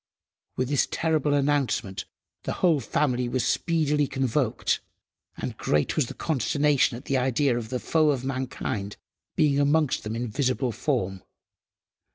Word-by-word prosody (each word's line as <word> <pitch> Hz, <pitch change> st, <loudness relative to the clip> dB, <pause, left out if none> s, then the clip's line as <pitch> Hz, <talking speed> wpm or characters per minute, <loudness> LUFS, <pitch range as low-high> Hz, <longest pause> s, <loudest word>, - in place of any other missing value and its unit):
With 130 Hz, 0 st, -1 dB
this 145 Hz, -2 st, +2 dB
terrible 155 Hz, -3 st, +1 dB
announcement 140 Hz, -9 st, 0 dB, 0.4 s
the -, -, -3 dB
whole 165 Hz, -5 st, +4 dB
family 125 Hz, -1 st, 0 dB
were 125 Hz, -, -1 dB
speedily 150 Hz, +1 st, +1 dB
convoked, 130 Hz, -2 st, 0 dB, 0.6 s
and -, -, -4 dB
great 75 Hz, -1 st, 0 dB
was 150 Hz, -6 st, +1 dB
the -, -, -8 dB
consternation 145 Hz, -3 st, +1 dB
at 130 Hz, -, -12 dB
the 135 Hz, -, +1 dB
idea 130 Hz, +1 st, +2 dB
of 115 Hz, -2 st, -4 dB
the 125 Hz, -, -1 dB
foe 155 Hz, +2 st, +2 dB
of 130 Hz, -3 st, 0 dB
mankind 130 Hz, -6 st, -3 dB, 0.4 s
being 145 Hz, -2 st, +3 dB
amongst 145 Hz, 0 st, +2 dB
them 110 Hz, +1 st, -4 dB
in 120 Hz, +1 st, -2 dB
visible 125 Hz, +1 st, 0 dB
form. 105 Hz, -6 st, -2 dB
135 Hz, 145 wpm, -26 LUFS, 120-145 Hz, 0.6 s, whole